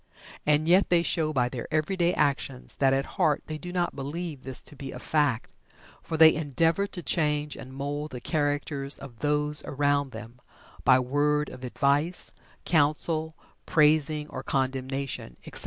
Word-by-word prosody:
And 150 +1 +3
yet 185 +3 +4
they 170 -1 +4
show 160 -3 0
by 125 -4 +1
their 125 +1 -6
everyday 170 +3 +1
actions 135 -2 -1
that 135 -1 +3
at 135 +1 +1
heart 150 -2 0
they 155 -1 -6
do 180 +2 -7
not 175 -1 -1
believe 145 +1 -5
this 130 -1 -4
to - - -11
be 135 -1 -7
a - - -7
fact, 145 -7 0 0.5
for 160 - -4
they 160 0 +8
endeavor 165 +6 +1
to 180 -3 -6
change 150 -2 0
and 130 - -10
mould 145 +3 -4
the 125 - -7
characters 145 -1 -2
of 125 -5 -11
those 150 0 +1
around 145 -1 0
them, 115 +2 -10 0.4
by 130 0 +6
word 145 +3 +1
of 130 - -11
advice, 140 +7 +2 0.3
counsel, 160 +1 +2 0.3
praising 150 -1 +3
or - - -6
condemnation, 130 - -3
etc. - - -5
145 Hz, 160 wpm, -27 LUFS, 135-155 Hz, 0.5 s, they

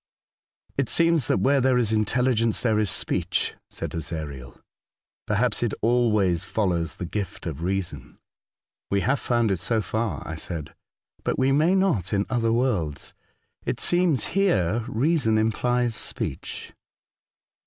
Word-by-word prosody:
" - - -41
It 135 - +1
seems 165 -5 +3
that - - +2
where 140 0 +3
there 130 0 +3
is 115 -3 +1
intelligence 115 +1 +2
there 110 -3 +2
is 105 -2 +1
speech," - - 0 0.2
said - - -5
Ezariel. 75 -6 -6 0.3
'' - - -71
Perhaps 110 +2 +1
it 120 -3 0
always 110 -7 +2
follows 85 -5 -1
the 90 - -5
gift 100 +3 -5
of 80 -3 -5
reason." 85 -8 -3 0.4
*' - - -69
We 100 0 +1
have 135 +6 +1
found 120 -3 +1
it 95 - 0
so 115 +5 0
far," 110 +1 -2
I 80 - -5
said, 80 -2 -6 0.5
^'but - - -1
we 130 +1 +3
may 155 +7 +3
not 170 - +1
in 100 0 +1
other 115 -2 +1
w^orlds. 115 - -1 0.5
It - - -2
seems 175 - +2
here 115 - +2
reason 125 -2 +1
implies 120 +2 +1
speech." - - -4
110 Hz, 150 wpm, -25 LUFS, 95-125 Hz, 0.5 s, seems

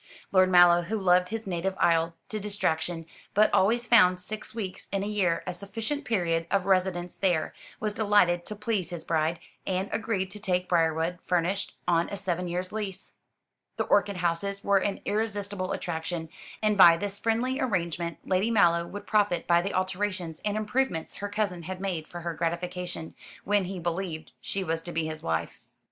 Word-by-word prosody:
Lord 185 -1 +5
Mallow, 175 -1 +7
who 205 +6 -2
loved 180 -2 +3
his 225 0 -4
native 190 0 -2
isle 165 0 +2
to 215 - -3
distraction, 175 -5 -1 0.3
but 215 +1 +4
always 235 +5 +3
found 185 -7 +6
six 215 +4 -4
weeks 195 -5 -5
in 195 0 0
a - - -2
year 195 -5 +1
a 180 - -3
sufficient 225 - -4
period 170 -6 0
of 195 -2 +1
residence 185 -2 +1
there, 175 -5 +1 0.3
was 215 -4 -2
delighted 205 -5 +3
to 210 - -5
please 210 -3 -1
his 175 -2 -6
bride, 160 +1 0 0.3
and 190 +1 -1
agreed 195 -4 -1
to 210 - -8
take 180 -3 0
Briarwood, 165 0 +1
furnished, 180 +3 0
on 170 -1 +2
a 200 - -4
seven 180 -2 -2
years' 180 +1 -3
lease. 205 -3 -5 0.6
The - - +1
orchid 200 -1 +2
houses 180 +3 -1
were 200 -1 +4
an 195 +1 -2
irresistible 205 -3 -2
attraction, 160 -1 -3 0.3
and 215 -1 +3
by 170 -2 +9
this 200 +2 -4
friendly 235 +4 0
arrangement 170 -7 -1
Lady 190 +4 +2
Mallow 170 -6 +4
would 205 +3 -8
profit 205 -5 +2
by 170 0 +4
the 195 +3 -3
alterations 185 -3 -2
and 210 0 0
improvements 215 -5 -1
her 205 - -4
cousin 205 -4 -1
had 185 +3 -6
made 180 -5 -3
for 175 - -8
her 170 0 -3
gratification, 170 0 -3 0.3
when 205 -1 +2
he 190 +1 -5
believed 170 -2 -3
she 195 - -3
was 165 -2 -1
to 175 - -7
be 165 -1 -1
his 155 0 -5
wife. 80 0 -2
185 Hz, 180 wpm, -28 LUFS, 170-205 Hz, 0.6 s, by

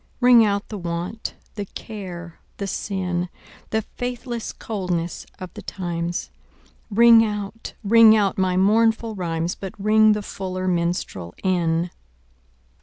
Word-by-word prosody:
Ring 245 -2 +7
out 200 -1 0
the 210 - -5
want, 175 +5 -4 0.2
the 205 -2 -4
care 180 -5 -8 0.2
the 200 - -3
sin, 180 -2 -2 0.4
The 220 0 0
faithless 245 0 -5
coldness 180 -6 -3
of 185 -1 -8
the - - -8
times; 175 -2 -4 0.6
Ring 230 +1 +7
out, 210 0 -4
ring 220 +1 +7
out 205 -2 +2
my 185 -2 +1
mournful 225 +3 +3
rhymes, 170 -3 -2
But 195 +1 -8
ring 215 +1 +5
the 210 0 -3
fuller 185 -1 -4
minstrel 170 - -2
in. 170 -2 +1
195 Hz, 125 wpm, -23 LUFS, 175-220 Hz, 0.6 s, Ring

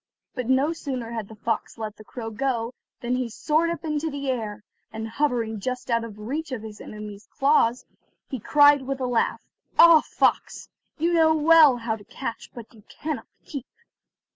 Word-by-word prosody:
But 250 -2 -4
no 270 +5 +3
sooner 255 -7 -5
had 225 -3 -4
the 220 - -12
fox 225 +2 -3
let 215 -1 -5
the 215 - -12
crow 225 0 -7
go 240 0 -1 0.3
than 245 +1 -1
he 250 -2 -2
soared 310 +8 +1
up 335 -2 -4
into 305 0 -1
the 280 -2 -2
air, 215 -4 -4 0.3
and 220 0 -5
hovering 230 -3 -1
just 250 +3 -4
out 230 0 +2
of 225 -3 -8
teach 285 +9 -4
of 240 -4 -4
his 215 -1 -9
enemy's 210 -1 -9
jaws, 265 -4 +3 0.4
he 260 - -5
cried 290 +4 +5
with 270 +1 -4
a 260 - -1
laugh: 245 -2 0 0.3
"Ah, 335 -2 +9
fox! - - 0 0.3
you 335 +2 +1
know 320 -1 +5
well 310 -3 +6
how 230 -1 -2
to 210 - -13
catch, 230 +2 -6
but 235 -1 -10
you 220 - -17
cannot 310 -2 -5 0.2
keep." 280 -5 -7
250 Hz, 185 wpm, -25 LUFS, 225-290 Hz, 0.4 s, Ah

